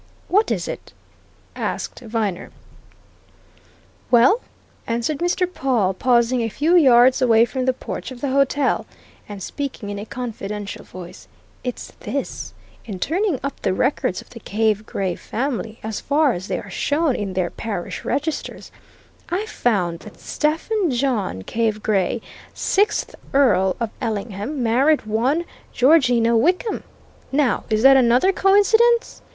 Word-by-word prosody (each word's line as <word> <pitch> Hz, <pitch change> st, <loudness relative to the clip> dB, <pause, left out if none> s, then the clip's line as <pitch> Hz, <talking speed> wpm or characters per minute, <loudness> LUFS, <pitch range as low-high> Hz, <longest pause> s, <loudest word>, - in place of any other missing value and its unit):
"What 415 Hz, +4 st, +3 dB
is -, -, -1 dB
it?" -, -, -7 dB, 0.6 s
asked -, -, -4 dB
Viner. 220 Hz, -6 st, -3 dB, 1.6 s
"Well," 255 Hz, -, +5 dB, 0.5 s
answered 235 Hz, +6 st, -1 dB
Mr. 350 Hz, +1 st, +1 dB
Pawle 255 Hz, -, 0 dB
pausing 240 Hz, +3 st, +2 dB
a 225 Hz, -, -1 dB
few 305 Hz, -, +2 dB
yards 255 Hz, -5 st, +6 dB
away 230 Hz, -2 st, +5 dB
from 255 Hz, +1 st, -3 dB
the 260 Hz, -, +4 dB
porch 250 Hz, -, -6 dB
of 255 Hz, -2 st, -9 dB
the 280 Hz, -, -2 dB
hotel, 275 Hz, 0 st, +1 dB, 0.4 s
and 200 Hz, -2 st, -7 dB
speaking 255 Hz, -6 st, -5 dB
in 205 Hz, -, -5 dB
a 205 Hz, -, -6 dB
confidential 210 Hz, -5 st, -5 dB
voice, 180 Hz, -2 st, -11 dB, 0.4 s
"it's 250 Hz, -2 st, -5 dB
this: -, -, -5 dB, 0.3 s
In 205 Hz, -4 st, -6 dB
turning 345 Hz, -, 0 dB
up 280 Hz, -, -4 dB
the 185 Hz, -, 0 dB
records 255 Hz, -7 st, 0 dB
of -, -, -19 dB
the 230 Hz, -, -10 dB
Cave 215 Hz, 0 st, 0 dB
Gray 190 Hz, -2 st, -2 dB
family, 230 Hz, -1 st, -4 dB
as 220 Hz, -1 st, -4 dB
far 290 Hz, -2 st, +2 dB
as 180 Hz, +3 st, -6 dB
they -, -, -1 dB
are -, -, -8 dB
shown 290 Hz, -2 st, +1 dB
in 200 Hz, -2 st, -3 dB
their 185 Hz, -2 st, -1 dB
parish 205 Hz, -6 st, -5 dB
registers, 305 Hz, +2 st, -3 dB, 0.6 s
I 370 Hz, +5 st, -1 dB
found 185 Hz, -, 0 dB
that 215 Hz, -, -13 dB
Stephen 330 Hz, +6 st, 0 dB
John 240 Hz, -, -1 dB
Cave 220 Hz, -, -1 dB
Gray, 210 Hz, +2 st, +1 dB, 0.3 s
sixth 410 Hz, +2 st, +1 dB, 0.2 s
Earl 190 Hz, -9 st, +4 dB
of 230 Hz, -2 st, -2 dB
Ellingham, 220 Hz, +4 st, -3 dB
married 265 Hz, +5 st, +3 dB
one 250 Hz, +10 st, 0 dB, 0.3 s
Georgina 245 Hz, -5 st, +4 dB
Wickham. 360 Hz, -, +1 dB, 0.5 s
Now, 275 Hz, -2 st, +1 dB
is 215 Hz, 0 st, +1 dB
that 270 Hz, 0 st, +8 dB
another 250 Hz, +8 st, +4 dB
coincidence? 445 Hz, +5 st, +3 dB
245 Hz, 140 wpm, -21 LUFS, 215-290 Hz, 1.6 s, that